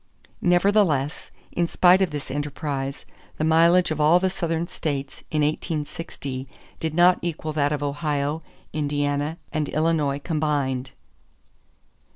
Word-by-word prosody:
Nevertheless, 175 -6 +2 0.2
in 170 -1 0
spite 180 +2 +5
of 190 - +3
this 145 -2 -5
enterprise, 140 -1 -3 0.3
the - - -1
mileage 165 +2 +4
of 155 -1 -1
all 160 +4 +6
the 190 0 +1
Southern 170 -2 -1
states 140 -6 -4
in 150 -1 +1
1860 145 -3 -3 0.3
did 160 -1 -3
not 175 +1 +5
equal 155 -2 -3
that 145 -1 +1
of 145 -1 -1
Ohio, 145 +1 -1 0.3
Indiana, 145 +1 -1 0.2
and 155 -2 -1
Illinois 155 -3 +1
combined. 145 -4 -1
150 Hz, 125 wpm, -24 LUFS, 145-165 Hz, 0.3 s, all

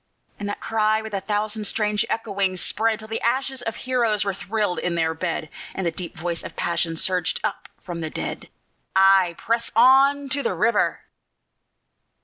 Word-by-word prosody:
And 205 0 -3
that 205 - -4
cry, 220 0 +1
with 220 -1 -8
a 195 - -1
thousand 210 +1 -2
strange 210 +1 +1
echoings, 195 -4 -1
spread, 225 +3 +1
Till 220 0 -10
the 225 +1 -3
ashes 260 +2 0
of 225 -2 -3
heroes 235 -5 0
were 200 - 0
thrilled 205 -1 -1
in 175 -1 -1
their 160 -1 +1
bed, 160 -1 -3 0.3
And 190 - -2
the 170 - +1
deep 170 0 -6
voice 170 +1 -2
of - - -8
passion 170 -1 -1
surged 180 -1 0
up - - -3
from 175 -2 -6
the 160 - -3
dead, - - -5 0.5
"_Ay, 190 -3 +5
press 230 +1 -1
on 270 +4 +6
to 280 +2 0
the - - -1
river! 220 -1 +2
210 Hz, 175 wpm, -23 LUFS, 180-225 Hz, 0.5 s, on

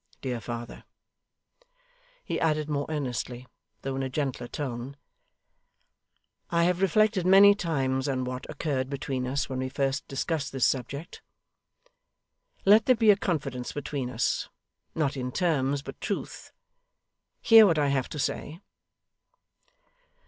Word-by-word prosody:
Dear 125 -3 -3
father,' 120 +1 -7 1.4
he - - -2
added, 155 -2 +1
more 145 -2 -2
earnestly 125 -4 -3 0.4
though 135 0 -3
in 135 - -2
a 135 - -2
gentler 130 -3 -3
tone, 130 0 -5 1.5
'I 170 0 +2
have 180 +1 +1
reflected 205 0 +3
many 195 +2 +8
times 135 -7 -1
on 130 -2 -1
what 125 +1 -5
occurred 140 -4 -2
between 135 -2 -3
us 140 +2 -1
when 130 -1 -4
we 130 0 -2
first 135 0 -1
discussed 140 0 -2
this 135 -2 +2
subject. 140 +5 -3 1.4
Let 210 +2 +6
there 255 - +6
be 220 -2 +5
a - - +5
confidence 150 -10 -3
between 140 -3 -4
us; 125 -1 -1 0.5
not 150 -3 0
in 125 -1 -3
terms, 145 -5 0
but - - -10
truth. - - -5 0.9
Hear 225 -2 +8
what 165 -4 +2
I 145 -2 +2
have 135 -2 0
to - - -7
say. 155 +3 -3
140 Hz, 135 wpm, -27 LUFS, 130-165 Hz, 1.5 s, many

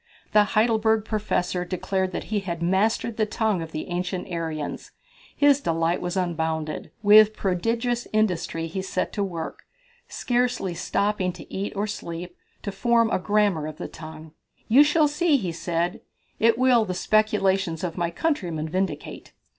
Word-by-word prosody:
The 210 - +6
Heidelberg 220 -1 +3
Professor 195 -5 -1
declared 185 +1 -2
that - - -4
he 210 - +2
had 170 -3 -4
mastered 210 +5 +1
the 215 -1 +1
tongue 215 -4 0
of 160 -1 -7
the 155 - -5
ancient 180 +1 -3
Aryans. 160 -3 -4 0.4
His 285 -1 +5
delight 165 -1 0
was 180 +1 -3
unbounded. 160 -3 -2
With 215 +1 +7
prodigious 230 +6 -1
industry 180 -6 0
he 170 +4 -4
set 190 -1 -2
to 205 - -1
work, 170 -4 -5 0.5
scarcely 245 -6 -1
stopping 200 +1 0
to 170 - -12
eat 195 +1 -2
or 200 +1 0
sleep, 175 -4 -6 0.3
to 200 - -3
form 230 +3 +2
a - - +1
grammar 200 -6 +1
of 155 -1 -8
the - - -6
language. 155 0 -9 0.4
"You 265 +6 +7
shall 300 +1 +3
see," 300 +1 +2
he 190 -9 -3
said, 170 +1 -2 0.4
"it 230 0 +4
will 250 -2 +4
the 185 -4 -3
speculations 195 -5 +1
of 175 -3 -3
my 175 -2 -1
countrymen 170 - -2
vindicate." 185 +4 -4
190 Hz, 155 wpm, -25 LUFS, 170-220 Hz, 0.5 s, With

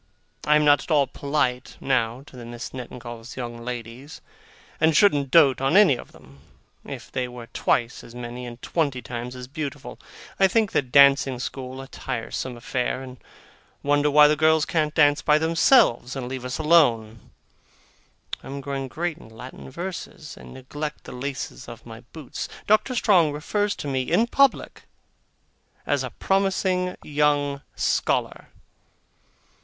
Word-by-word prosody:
I 150 - +5
am 150 0 +3
not 145 -2 +5
at - - -11
all 145 -3 +4
polite, 130 -2 -2
now, 125 -1 0
to 135 - -16
the 125 - -9
Misses 120 +1 -8
Nettingalls' 120 -2 -9
young 120 -2 -6
ladies, 125 +4 -7 0.6
and 160 -1 +3
shouldn't 145 -9 +4
dote 140 -4 +5
on 135 +7 +3
any 200 -10 +6
of - - -11
them, 70 +1 -18 0.4
if - - -9
they 130 -1 -2
were 120 -1 -9
twice 120 0 0
as 115 - -13
many 125 0 -7
and 120 0 -10
twenty 140 -7 -1
times 120 +2 -6
as 125 0 -8
beautiful. 140 0 -6 0.4
I 195 - +6
think 215 +2 +1
the - - +2
dancing 140 0 +5
school 130 +1 -6
a - - -11
tiresome 125 -1 -5
affair, 125 +2 -2
and 130 -1 -10 0.7
wonder 145 +1 +2
why 150 +1 +7
the 150 - +3
girls 155 0 +3
can't 155 -3 -1
dance 145 -1 +4
by 150 0 +4
themselves 160 - +3
and 130 -2 -4
leave 130 0 -6
us 125 - -3
alone. 120 -9 +2 1.1
I - - -12
am 140 +1 -6
growing 135 -1 -4
great 165 +4 -4
in - - -14
Latin 125 +5 -11
verses, 170 -1 -7
and - - -13
neglect 145 +3 -6
the - - -10
laces 135 +1 -6
of 120 0 -11
my 115 -1 -10
boots. 155 -6 -7 0.2
Doctor 215 +5 +2
Strong 175 -10 +3
refers 205 +7 -1
to - - -6
me 135 -2 0
in 230 - +4
public 275 +2 +1 1.0
as - - 0
a - - -4
promising 190 -1 0
young 145 -1 +1
scholar. - - -1
140 Hz, 160 wpm, -24 LUFS, 125-155 Hz, 1.1 s, why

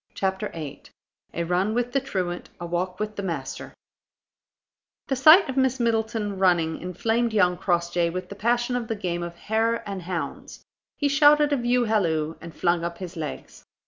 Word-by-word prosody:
CHAPTER 190 +2 -1
VIII 155 -4 -7 0.5
A 170 - -1
RUN 180 +5 0
WITH 245 0 0
THE 275 - +2
TRUANT; 185 -9 -4
A 175 - -5
WALK 180 +2 -2
WITH 210 0 -4
THE - - -2
MASTER 180 -4 -5 1.4
The 270 - +1
sight 310 +9 +7
of 265 0 -5
Miss 265 -1 +2
Middleton 220 -3 -1
running 170 -4 +2
inflamed 225 +5 -1
young 180 -4 +3
Crossjay 175 -1 0
with 185 +2 -5
the - - -6
passion 240 +3 0
of 240 -2 -2
the 225 - -2
game 175 -4 -3
of 170 0 -5
hare 225 +4 -1
and 195 -2 -4
hounds. 175 -1 -5 0.3
He 290 - +1
shouted 295 +1 +5
a - - +4
view 245 0 +2
halloo, 165 -8 +1
and 170 0 -8
flung 175 -1 +1
up 170 0 -4
his 180 -3 -7
legs. 155 -3 -7
200 Hz, 175 wpm, -25 LUFS, 175-235 Hz, 1.4 s, sight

